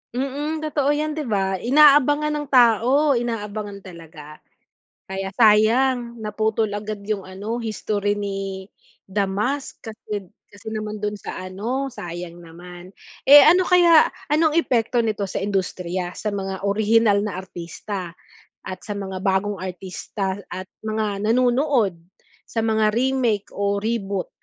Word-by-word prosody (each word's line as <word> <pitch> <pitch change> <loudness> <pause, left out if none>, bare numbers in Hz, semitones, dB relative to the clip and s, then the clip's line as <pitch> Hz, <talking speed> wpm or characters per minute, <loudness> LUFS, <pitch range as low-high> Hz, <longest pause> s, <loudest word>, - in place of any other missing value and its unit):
Mm, 290 +4 -3
totoo 290 -2 0
'yan, 305 +1 -1
di 300 -4 -4
ba? 195 -3 0
Inaabangan 290 +2 +5
ng 295 -1 -3
tao, 255 +4 +4
inaabangan 210 -4 -3
talaga. 160 -4 -12 0.7
Kaya 190 0 -4
sayang 235 +3 +3
naputol 215 0 -1
agad 210 0 -5
yung 200 -3 -2
ano, 205 +5 -5
history 210 -2 -2
ni 195 -1 -5 0.4
The 200 +1 +1
Mask 245 +9 -3
kasi 210 -3 -7 0.2
kasi 205 +2 -16
naman 215 -1 -5
dun 210 0 -2
sa 185 - -7
ano, 230 +9 -3
sayang 175 -4 -7
naman. 175 +2 -12 0.3
Eh, 285 +1 +10
ano 360 +2 +5
kaya 345 -3 +6 0.2
anong 310 +1 +3
epekto 240 -6 +2
nito 215 -3 -1
sa 195 - -4
industriya 185 -2 -2
sa 215 - -3
mga 195 -1 -4
orihinal 210 +1 +3
na 205 - -4
artista 180 0 -7 0.5
at 185 0 -6
sa 205 -2 -5
mga 190 -2 -5
bagong 200 +1 0
artista 190 +1 -4
at 185 +1 -6 0.2
mga 215 -2 -2
nanonood 250 - +2 0.5
sa 225 -1 -1
mga 220 -1 +2
remake 240 -3 0
o 200 0 0
reboot? 200 -3 -2
210 Hz, 135 wpm, -22 LUFS, 195-245 Hz, 0.7 s, Eh